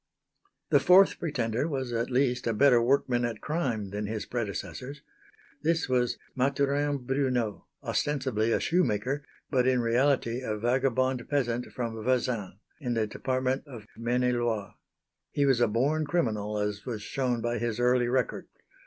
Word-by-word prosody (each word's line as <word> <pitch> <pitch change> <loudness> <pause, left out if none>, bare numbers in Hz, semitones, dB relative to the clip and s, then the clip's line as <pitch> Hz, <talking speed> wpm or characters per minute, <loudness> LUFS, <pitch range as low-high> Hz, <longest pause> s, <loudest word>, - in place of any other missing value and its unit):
The 145 - +6
fourth 185 +6 +6
pretender 125 -4 -1
was 130 -5 -3
at 115 0 -1
least 125 -1 +1
a 115 - +1
better 125 0 +5
workman 125 -1 +2
at 115 -3 -2
crime 120 - -2
than 105 +1 -3
his 110 0 -3
predecessors. 125 +4 -5 0.6
This 165 +2 +1
was 125 -2 +1 0.2
Mathurin 140 +1 0
Brunneau 125 -5 -1 0.2
ostensibly 130 -6 0
a - - +2
shoemaker 145 - 0 0.3
but 130 -2 +3
in 130 -1 +3
reality 120 0 +1
a 110 -4 -3
vagabond 130 +1 0
peasant 125 -4 0
from 115 -3 -4
Vezins, 125 -6 0 0.2
in 125 -5 -2
the 110 -1 +1
department 130 +5 -2
of 120 -7 -10
Maine 120 +2 0
et 125 0 +2
Loire. 115 -5 -1 0.6
He 145 - +1
was 135 -3 +3
a - - +5
born 145 +8 +1
criminal 105 -11 -1
as 105 0 -2
was 115 -5 -5
shown 125 +1 -1
by 120 0 -1
his 120 0 -2
early 125 0 +3
record. 125 0 -1
125 Hz, 155 wpm, -28 LUFS, 115-135 Hz, 0.6 s, The